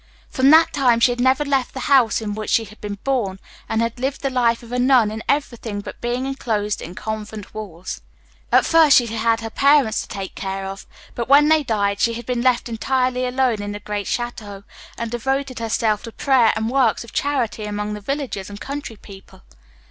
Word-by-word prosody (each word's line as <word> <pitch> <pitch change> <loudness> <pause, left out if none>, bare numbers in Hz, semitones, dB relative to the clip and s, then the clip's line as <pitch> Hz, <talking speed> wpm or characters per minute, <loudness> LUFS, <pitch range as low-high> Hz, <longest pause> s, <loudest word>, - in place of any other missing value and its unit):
From 265 +1 +3
that 320 +2 +6
time 250 -5 +3
she 245 - +4
had 245 - -4
never 260 +4 +3
left 270 -3 0
the 265 - -4
house 255 -6 +3
in 210 -2 -3
which 215 0 -5
she 225 - +3
had 215 +1 -16
been 205 -1 -5
born, 225 -9 -1 0.3
and 225 +1 +1
had 230 +1 -3
lived 270 +3 -3
the 275 - 0
life 240 -2 +1
of 235 - -12
a 250 - -1
nun 245 -4 +4
in 220 +1 -5
everything 240 -7 -1
but 205 - -9
being 245 +2 -2
enclosed 220 -6 -2
in 175 - -8
convent 215 -1 -6
walls. 190 -5 -7 0.5
At - - +5
first 320 -3 +6
she 245 - +3
had 225 -1 -4
had 230 0 +2
her 225 -1 -6
parents 280 -5 +3
to - - -9
take 195 -1 -6
care 195 0 -4
of, 195 0 -7 0.3
but 235 +1 -4
when 290 +2 +6
they 315 -1 +5
died 205 -6 -1
she 230 - +2
had 235 0 -7
been 245 -1 -1
left 250 -1 +2
entirely 255 +2 0
alone 250 -4 0
in 205 0 -4
the 205 - -6
great 205 -1 -4
château, 215 -5 -4 0.3
and 230 -1 -4
devoted 265 +2 -2
herself 220 -2 0
to 230 - -8
prayer 255 -2 +3
and 220 +1 -2
works 255 -5 +2
of 235 - -14
charity 250 -7 -1
among 210 0 -3
the 210 - -6
villagers 250 -5 -4
and 205 0 -9
country 280 -3 -6
people. 195 -2 -15
235 Hz, 215 wpm, -21 LUFS, 210-260 Hz, 0.5 s, that